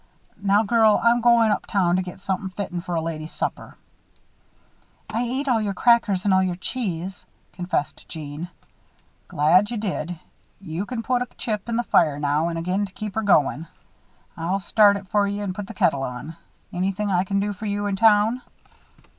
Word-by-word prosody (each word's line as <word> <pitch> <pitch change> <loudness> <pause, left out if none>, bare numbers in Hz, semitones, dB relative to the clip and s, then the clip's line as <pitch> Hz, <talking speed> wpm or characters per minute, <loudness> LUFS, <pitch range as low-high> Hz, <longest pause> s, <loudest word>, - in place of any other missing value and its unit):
Now, 200 +2 +3
girl, 220 -1 +4
I'm 235 +1 +4
goin' 235 -2 +5
up - - -2
town 180 -3 +2
to - - +1
get 180 0 -8
somethin' 190 0 -3
fitten 185 -2 -4
for 175 -1 -4
a 165 - 0
lady's 155 -1 -5
supper - - -5 0.7
" - - -37
"I 225 +2 -1
ate 260 +4 -2
all 235 -4 +2
your 200 -2 -2
crackers 215 -4 +3
and 200 - +3
all 190 - +4
your 185 -2 0
cheese," 185 -3 -3 0.3
confessed 175 -4 -3
Jeanne. 155 +1 -6 0.8
"Glad 175 +8 +3
you 240 - -3
did. 180 -5 -3 0.4
You 185 +1 -5
can 235 -3 -4
put 250 +1 0
a 250 - -2
chip 215 -1 -3
in 230 - -1
the 240 - +1
fire 155 -10 +3
now 145 +2 +1
and 170 -1 -3
again 185 +4 -1
to 190 - -17
keep 210 -1 -6
her 220 - -1
going. 165 -5 +2 0.7
I'll 170 +3 -1
start 200 +2 +4
it 200 -1 -10
for 205 +1 +2
you 200 +1 -3
and 190 -2 -3
put 200 0 -6
the 225 - -9
kettle 155 -9 +2
on. 135 +5 -6 0.4
Anythin' 195 +3 -1
I 180 -1 +2
can 195 +1 -1
do 205 +1 -1
for 210 +2 -6
you 205 0 -2
up 200 -1 -1
town?" 220 +3 +4
195 Hz, 195 wpm, -23 LUFS, 175-215 Hz, 0.8 s, goin